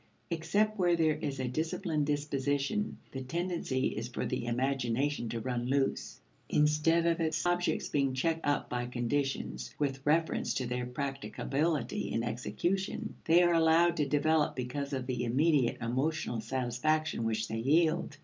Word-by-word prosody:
Except 200 Hz, +6 st, +1 dB
where 175 Hz, -2 st, +4 dB
there 160 Hz, -2 st, +3 dB
is 140 Hz, -3 st, -4 dB
a 130 Hz, -, -1 dB
disciplined 155 Hz, +2 st, -1 dB
disposition, 145 Hz, +6 st, -1 dB
the 135 Hz, -, -5 dB
tendency 165 Hz, -2 st, -1 dB
is 115 Hz, +2 st, -4 dB
for 125 Hz, -, -4 dB
the 125 Hz, -2 st, -2 dB
imagination 130 Hz, +1 st, 0 dB
to 115 Hz, -, -3 dB
run 120 Hz, 0 st, -2 dB
loose. 135 Hz, +1 st, 0 dB, 0.3 s
Instead 155 Hz, +3 st, +3 dB
of 170 Hz, 0 st, +2 dB
its 160 Hz, 0 st, 0 dB
objects 175 Hz, 0 st, +1 dB
being 135 Hz, -2 st, 0 dB
checked 165 Hz, +4 st, 0 dB
up 145 Hz, -1 st, 0 dB
by 120 Hz, 0 st, -2 dB
conditions 120 Hz, -, -2 dB
with 135 Hz, -2 st, -2 dB
reference 160 Hz, +3 st, +1 dB
to 130 Hz, -, -1 dB
their 125 Hz, 0 st, -2 dB
practicability 135 Hz, -2 st, -2 dB
in 115 Hz, -, 0 dB
execution, 185 Hz, -, -2 dB
they 170 Hz, +2 st, +6 dB
are 175 Hz, 0 st, +4 dB
allowed 165 Hz, +1 st, +4 dB
to 150 Hz, -, +1 dB
develop 150 Hz, +2 st, +2 dB
because 135 Hz, +3 st, -3 dB
of 130 Hz, -2 st, -2 dB
the 125 Hz, -1 st, -2 dB
immediate 135 Hz, +1 st, +2 dB
emotional 130 Hz, 0 st, -1 dB
satisfaction 130 Hz, +5 st, 0 dB
which 110 Hz, 0 st, -1 dB
they 110 Hz, -, -3 dB
yield. 160 Hz, +7 st, +2 dB
140 Hz, 150 wpm, -31 LUFS, 125-160 Hz, 0.3 s, they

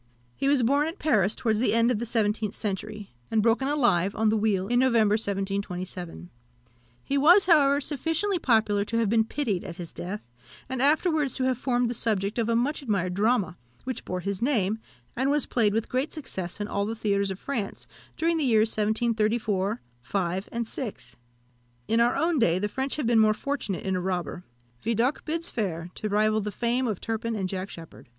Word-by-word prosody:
He 275 Hz, -, -1 dB
was 280 Hz, -3 st, +3 dB
born 280 Hz, +5 st, +3 dB
at 330 Hz, +4 st, -5 dB
Paris, 215 Hz, -, +2 dB
towards 220 Hz, -2 st, 0 dB
the 240 Hz, -1 st, +2 dB
end 230 Hz, +1 st, +4 dB
of 225 Hz, -, 0 dB
the 235 Hz, -, -3 dB
seventeenth 215 Hz, -2 st, 0 dB
century, 210 Hz, 0 st, -4 dB, 0.2 s
and 220 Hz, -2 st, +2 dB
broken 235 Hz, +4 st, +2 dB
alive 205 Hz, -10 st, +2 dB
on 220 Hz, 0 st, +2 dB
the 220 Hz, -, +2 dB
wheel 205 Hz, -3 st, +1 dB
in 245 Hz, +2 st, +2 dB
November 230 Hz, -5 st, +4 dB
1727. 190 Hz, -, -3 dB, 0.7 s
He 280 Hz, 0 st, 0 dB
was, 350 Hz, +8 st, +6 dB
however, 285 Hz, -5 st, +5 dB
sufficiently 325 Hz, +7 st, 0 dB
popular 220 Hz, -6 st, +2 dB
to 230 Hz, +3 st, -2 dB
have 230 Hz, -3 st, +2 dB
been 225 Hz, 0 st, +3 dB
pitied 220 Hz, -8 st, -2 dB
at 175 Hz, -3 st, -7 dB
his 170 Hz, -2 st, -8 dB
death, 195 Hz, +4 st, -5 dB, 0.4 s
and 260 Hz, -1 st, -3 dB
afterwards 300 Hz, -1 st, +2 dB
to 260 Hz, -, -1 dB
have 255 Hz, -2 st, +1 dB
formed 245 Hz, -2 st, +1 dB
the 235 Hz, -, -2 dB
subject 210 Hz, -1 st, -1 dB
of 230 Hz, 0 st, 0 dB
a 230 Hz, -, +2 dB
much 265 Hz, +7 st, 0 dB
admired 195 Hz, -8 st, -1 dB
drama, 205 Hz, -2 st, +1 dB, 0.2 s
which 255 Hz, -2 st, -4 dB
bore 180 Hz, 0 st, -4 dB
his 200 Hz, +1 st, -3 dB
name, 220 Hz, -5 st, +1 dB, 0.4 s
and 265 Hz, +3 st, +1 dB
was 290 Hz, -1 st, +3 dB
played 220 Hz, -4 st, +2 dB
with 220 Hz, +1 st, -1 dB
great 260 Hz, +4 st, -1 dB
success 190 Hz, -, -5 dB
in 205 Hz, -, -2 dB
all 200 Hz, 0 st, -1 dB
the 225 Hz, -, -3 dB
theatres 200 Hz, -2 st, 0 dB
of 190 Hz, -, -4 dB
France 225 Hz, -4 st, -4 dB, 0.3 s
during 330 Hz, +1 st, +1 dB
the 315 Hz, -, 0 dB
years 220 Hz, -4 st, +3 dB
1734, 215 Hz, -1 st, 0 dB, 0.2 s
5, 185 Hz, -, -2 dB
and 235 Hz, 0 st, -2 dB
6. 210 Hz, -, -6 dB, 0.7 s
In 225 Hz, -, +2 dB
our 240 Hz, +1 st, +3 dB
own 320 Hz, +1 st, +1 dB
day 175 Hz, -7 st, +3 dB
the 205 Hz, +3 st, -1 dB
French 265 Hz, +6 st, -2 dB
have 300 Hz, -, -2 dB
been 230 Hz, -1 st, +4 dB
more 215 Hz, -1 st, +4 dB
fortunate 250 Hz, -9 st, -3 dB
in 190 Hz, -1 st, 0 dB
a 180 Hz, -, -1 dB
robber; 180 Hz, -2 st, -3 dB, 0.4 s
Vidocq 230 Hz, +5 st, 0 dB
bids 330 Hz, +2 st, -2 dB
fair 175 Hz, -6 st, -3 dB
to 215 Hz, -, -4 dB
rival 215 Hz, +1 st, +2 dB
the 210 Hz, +1 st, -3 dB
fame 245 Hz, +4 st, 0 dB
of 215 Hz, -5 st, -2 dB
Turpin 225 Hz, 0 st, -3 dB
and 190 Hz, -3 st, -1 dB
Jack 190 Hz, +1 st, -4 dB
Sheppard. 165 Hz, -6 st, -12 dB
220 Hz, 200 wpm, -26 LUFS, 200-255 Hz, 0.7 s, was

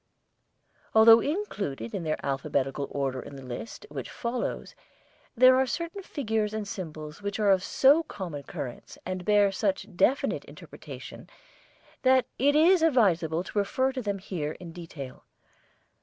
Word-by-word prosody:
Although 225 Hz, +1 st, +9 dB
included 205 Hz, -, -3 dB
in -, -, -2 dB
their 155 Hz, -1 st, -1 dB
alphabetical 135 Hz, 0 st, -1 dB
order 135 Hz, -2 st, -2 dB
in 140 Hz, -, -10 dB
the 135 Hz, -1 st, -10 dB
list 125 Hz, -, -7 dB
which -, -, -6 dB
follows, 235 Hz, 0 st, -4 dB, 0.6 s
there 255 Hz, +2 st, +7 dB
are 265 Hz, 0 st, +2 dB
certain 335 Hz, +8 st, -4 dB
figures 220 Hz, -, -2 dB
and 215 Hz, -2 st, -3 dB
symbols 155 Hz, -5 st, -7 dB
which 200 Hz, +1 st, -3 dB
are 205 Hz, -2 st, +4 dB
of 190 Hz, -1 st, +3 dB
so 280 Hz, +9 st, +5 dB
common 180 Hz, -, -6 dB
occurrence 130 Hz, -3 st, -8 dB
and 185 Hz, 0 st, -4 dB
bear 205 Hz, 0 st, +4 dB
such 195 Hz, 0 st, -2 dB
definite 265 Hz, +9 st, +2 dB
interpretation -, -, -11 dB, 0.7 s
that 260 Hz, -1 st, +4 dB
it 285 Hz, +2 st, +3 dB
is 340 Hz, +3 st, +5 dB
advisable 180 Hz, -, +3 dB
to 205 Hz, -, -2 dB
refer 260 Hz, +6 st, +1 dB
to 260 Hz, -1 st, -4 dB
them 205 Hz, -3 st, -2 dB
here 170 Hz, -6 st, -4 dB
in 175 Hz, -2 st, -10 dB
detail. 165 Hz, -6 st, -9 dB
200 Hz, 145 wpm, -28 LUFS, 155-255 Hz, 0.7 s, Although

